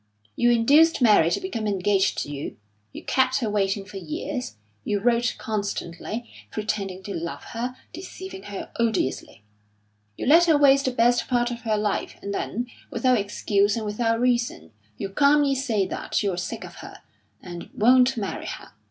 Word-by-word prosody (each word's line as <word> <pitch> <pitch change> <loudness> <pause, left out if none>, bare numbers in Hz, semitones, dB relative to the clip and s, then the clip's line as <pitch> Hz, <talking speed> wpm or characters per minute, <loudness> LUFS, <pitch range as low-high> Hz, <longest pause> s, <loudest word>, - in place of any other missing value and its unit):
You 240 - +3
induced 285 +8 +5
Mary 210 -9 +5
to - - 0
become 230 - -3
engaged 200 0 +1
to 145 - -8
you; 145 0 -6 0.3
you - - -9
kept 260 0 +2
her 230 -6 -1
waiting 195 -1 0
for 200 0 -9
years; 270 - -5 0.3
you 205 - -1
wrote 240 +2 +1
constantly, 210 +1 -4 0.2
pretending 200 -3 -3
to 200 - -5
love 160 -4 -5
her, 245 +2 -3 0.2
deceiving 380 0 -8
her 200 - -7
odiously; 220 - -1 0.7
you - - -4
let 330 +6 +6
her 320 -3 +4
waste 275 -1 +5
the 260 - +1
best 240 0 +2
part 240 -1 +1
of 235 -1 -6
her 220 -2 0
life, 210 -1 -2
and 200 - -5
then, 240 +4 -2 0.2
without 250 0 +2
excuse 205 0 +1
and 225 -2 -3
without 230 +2 0
reason, 235 - 0 0.3
you - - -3
calmly 280 +6 +3
say 240 -7 0
that - - -2
you're 195 -3 0
sick 175 - -5
of - - -11
her, - - -11 0.4
and 175 -2 -9
won't 250 +3 +5
marry 205 -3 -4
her. - - -8
225 Hz, 170 wpm, -24 LUFS, 200-250 Hz, 0.7 s, let